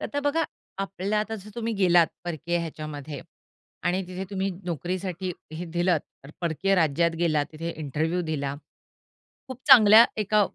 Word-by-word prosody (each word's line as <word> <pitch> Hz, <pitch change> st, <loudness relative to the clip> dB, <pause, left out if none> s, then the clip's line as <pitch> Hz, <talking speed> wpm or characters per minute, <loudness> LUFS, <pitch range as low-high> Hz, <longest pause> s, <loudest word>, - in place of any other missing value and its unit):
तर -, -, -5 dB
आता 285 Hz, -, -2 dB
बघा 325 Hz, +3 st, +2 dB, 0.4 s
आपल्या 195 Hz, +1 st, -2 dB
आता 220 Hz, +1 st, -3 dB
जर 210 Hz, -, -12 dB
तुम्ही 230 Hz, -1 st, -2 dB
गेलात 175 Hz, -4 st, +5 dB, 0.2 s
परकीय 170 Hz, 0 st, -2 dB
ह्याच्यामध्ये 155 Hz, -3 st, -6 dB, 0.7 s
आणि 185 Hz, +2 st, +1 dB
तिथे 185 Hz, +1 st, -5 dB
तुम्ही 195 Hz, 0 st, -1 dB
नोकरीसाठी 180 Hz, +2 st, -3 dB, 0.2 s
हे 175 Hz, +3 st, -5 dB
दिलंत 175 Hz, -5 st, -1 dB
परकीय 175 Hz, +4 st, +1 dB
राज्यात 170 Hz, 0 st, +2 dB
गेलात 155 Hz, -4 st, +1 dB
तिथे 165 Hz, +2 st, -4 dB
इंटरव्ह्यू 160 Hz, +5 st, -1 dB
दिला. 140 Hz, -2 st, -2 dB, 0.9 s
खूप 260 Hz, 0 st, -8 dB
चांगल्या 225 Hz, -4 st, +9 dB, 0.2 s
एका 210 Hz, +1 st, +2 dB
175 Hz, 140 wpm, -26 LUFS, 160-195 Hz, 0.9 s, चांगल्या